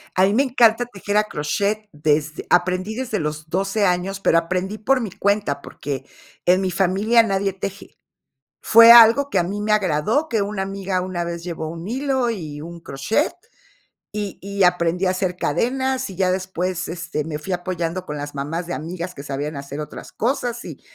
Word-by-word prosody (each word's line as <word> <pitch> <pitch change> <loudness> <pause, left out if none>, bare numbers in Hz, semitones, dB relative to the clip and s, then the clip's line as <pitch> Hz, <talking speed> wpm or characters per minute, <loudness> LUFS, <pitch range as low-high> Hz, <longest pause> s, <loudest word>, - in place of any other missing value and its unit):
A 185 - +5
mí 200 - +1
me 260 +6 +4
encanta 245 -3 +3
tejer 205 -3 -5
a 210 - +5
crochet 205 +5 -2
desde 150 +1 0
aprendí 185 +4 +1
desde 235 -4 -2
los 150 0 -4
12 195 +4 0
años, 185 +2 0
pero 165 - +3
aprendí 185 +4 -3
por 255 +5 +2
mi 225 -4 -3
cuenta, 195 -8 0
porque 140 -2 -6 0.4
en 180 +1 +5
mi 190 -1 0
familia 195 +6 +3
nadie 195 -2 0
teje. 195 +1 -7 0.7
Fue 230 +1 +9
algo 235 +4 +7
que - - +2
a - - +3
mí 200 +4 -4
me 215 0 +1
agradó, 210 - +1
que 225 -6 +1
una 200 -1 -2
amiga 195 -1 -2
una 180 -1 -3
vez 170 0 -5
llevó 165 -2 -5
un 165 +3 -7
hilo 265 0 0
y 155 -9 -6
un 170 +2 -9
crochet, 165 - -1 0.8
y 205 -2 -4
y 200 0 -1
aprendí 180 0 +2
a - - +3
hacer 185 -1 -1
cadenas, 260 - -1
y 190 - -9
ya 185 0 +2
después, 185 -1 -2
este, 165 -3 -4
me 155 -2 -4
fui 170 +5 -6
apoyando 175 0 -3
con 150 - -5
las 145 0 -6
mamás 150 +5 -3
de 175 - -4
amigas 170 +3 -5
que 140 - -8
sabían 145 +1 -4
hacer 140 +1 -6
otras 150 - -9
cosas, 240 0 -1
y - - -9
185 Hz, 190 wpm, -21 LUFS, 165-210 Hz, 0.8 s, Fue